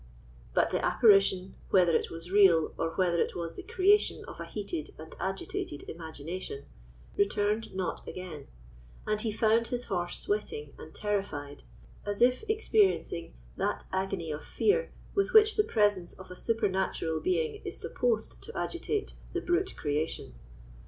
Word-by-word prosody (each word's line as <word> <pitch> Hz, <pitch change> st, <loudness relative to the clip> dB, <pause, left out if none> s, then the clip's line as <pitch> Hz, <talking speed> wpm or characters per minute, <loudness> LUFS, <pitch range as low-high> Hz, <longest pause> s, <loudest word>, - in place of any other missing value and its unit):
But -, -, +3 dB
the -, -, 0 dB
apparition, 195 Hz, -4 st, +4 dB, 0.2 s
whether 175 Hz, -3 st, +5 dB
it -, -, +1 dB
was 165 Hz, +2 st, -8 dB
real 190 Hz, -6 st, +5 dB
or 165 Hz, -, -1 dB
whether 175 Hz, -2 st, +2 dB
it -, -, -1 dB
was 170 Hz, -1 st, -4 dB
the -, -, -6 dB
creation 400 Hz, +3 st, +3 dB
of -, -, -10 dB
a -, -, -4 dB
heated 200 Hz, -7 st, -5 dB
and 160 Hz, +1 st, -10 dB
agitated 190 Hz, -6 st, -3 dB
imagination, 160 Hz, -2 st, -6 dB, 0.5 s
returned 205 Hz, +1 st, +1 dB
not 185 Hz, -1 st, -3 dB
again; 170 Hz, -6 st, -7 dB, 0.6 s
and 215 Hz, 0 st, 0 dB
he 220 Hz, -, -1 dB
found 225 Hz, +2 st, +3 dB
his 245 Hz, 0 st, -3 dB
horse 175 Hz, -2 st, -2 dB
sweating 150 Hz, -8 st, -2 dB
and 155 Hz, -, -11 dB
terrified, 195 Hz, -9 st, -3 dB, 0.4 s
as 205 Hz, -1 st, -3 dB
if 250 Hz, -, +4 dB
experiencing 415 Hz, -, +1 dB, 0.2 s
that -, -, -1 dB
agony 190 Hz, -4 st, -1 dB
of 150 Hz, 0 st, -5 dB
fear 475 Hz, +4 st, +1 dB, 0.2 s
with 395 Hz, -1 st, +1 dB
which 435 Hz, 0 st, +7 dB
the 425 Hz, -, +4 dB
presence 205 Hz, -, +1 dB
of 190 Hz, -1 st, -12 dB
a -, -, -7 dB
supernatural 190 Hz, -7 st, 0 dB
being 425 Hz, +4 st, 0 dB
is -, -, -5 dB
supposed 480 Hz, -2 st, -1 dB
to 455 Hz, -, -8 dB
agitate 425 Hz, -1 st, -2 dB, 0.2 s
the 355 Hz, -, 0 dB
brute 360 Hz, +2 st, 0 dB
creation. 150 Hz, +1 st, -2 dB
195 Hz, 150 wpm, -30 LUFS, 170-240 Hz, 0.6 s, which